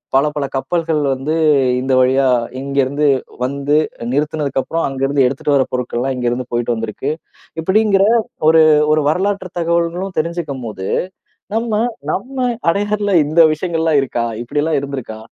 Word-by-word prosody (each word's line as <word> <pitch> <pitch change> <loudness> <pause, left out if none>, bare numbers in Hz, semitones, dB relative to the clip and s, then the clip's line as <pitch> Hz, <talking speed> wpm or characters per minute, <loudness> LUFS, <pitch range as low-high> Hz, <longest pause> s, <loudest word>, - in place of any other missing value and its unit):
பல 135 +2 +4
பல 145 -2 -1
கப்பல்கள் 165 +1 -1
வந்து 135 +4 -2 0.5
இந்த 130 0 0
வழியா 130 +1 +3 0.3
இங்கிருந்து 140 +1 0 0.4
வந்து 140 +2 -1 0.4
நிறுத்துனதுக்கு 150 -1 -1
அப்புறம், 165 0 -2
அங்கிருந்து 135 0 +1
எடுத்துட்டு 140 +2 0
வர 135 -1 +3
பொருட்கள்லாம், 125 +1 -2
இங்கிருந்து 125 0 -2
போயிட்டு 120 0 0
வந்திருக்கு. 115 +5 -3 0.5
இப்படிங்கிற 195 +2 +3 0.5
ஒரு 160 0 +6 0.3
ஒரு 155 -1 +2
வரலாற்றுத் 190 +2 -2
தகவல்களும் 170 +2 -1
தெரிஞ்சுக்கும் 155 -6 -3
போது, 95 -3 -6 0.7
நம்ம 225 -2 0 0.3
நம்ம 255 +4 -2 0.2
அடையாறுல 205 +2 0
இந்த 155 +3 +2
விஷயங்கள்லாம் 160 -2 +1
இருக்கா? 120 -3 -2 0.2
இப்படியெல்லாம் 150 +5 0
இருந்திருக்கா? 135 -6 -6
150 Hz, 125 wpm, -17 LUFS, 135-170 Hz, 0.7 s, ஒரு